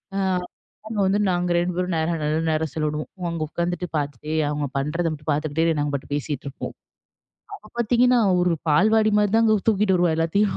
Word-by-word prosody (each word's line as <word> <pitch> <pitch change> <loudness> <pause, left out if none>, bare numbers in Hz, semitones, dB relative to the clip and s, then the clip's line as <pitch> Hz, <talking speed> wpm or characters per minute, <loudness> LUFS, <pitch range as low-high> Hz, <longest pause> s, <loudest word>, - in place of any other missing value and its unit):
ஆ - - 0 0.7
அங்க 220 -2 -3
வந்து 195 +2 +2
நாங்க 175 0 0
2 175 +1 0
பேரும் 180 -1 -1
நேரம் 160 0 -1
நல்ல 150 +1 0
நேரம் 155 -1 -1
செலவிடுவோம். 155 -1 -2 0.2
அங்க 165 - -4
உட்காந்துட்டு 175 +1 -2
பார்த்துட்டே 145 +1 -4 0.2
அவங்க 150 0 -2
பண்றத 165 +5 -1
மட்டும் 150 0 -8
பார்த்துக்கிட்டே 155 +2 0
நாங்க 145 0 -1
பாட்டுக்கு 140 +1 -3
பேசிட்டு 145 -1 -4
இருப்போம். - - -7 0.8
அப்ப 215 +1 -13
பார்த்தீங்கன்னா, 245 +2 +3 0.2
ஒரு 180 -1 +2 0.2
பால்வாடி 215 +7 +4
மாதிரிதாங்க 215 +1 +3
தூக்கிட்டு 205 -3 +3
வருவா 175 -2 +2
எல்லாத்தையும். 195 +5 +1
170 Hz, 165 wpm, -23 LUFS, 150-205 Hz, 0.8 s, பால்வாடி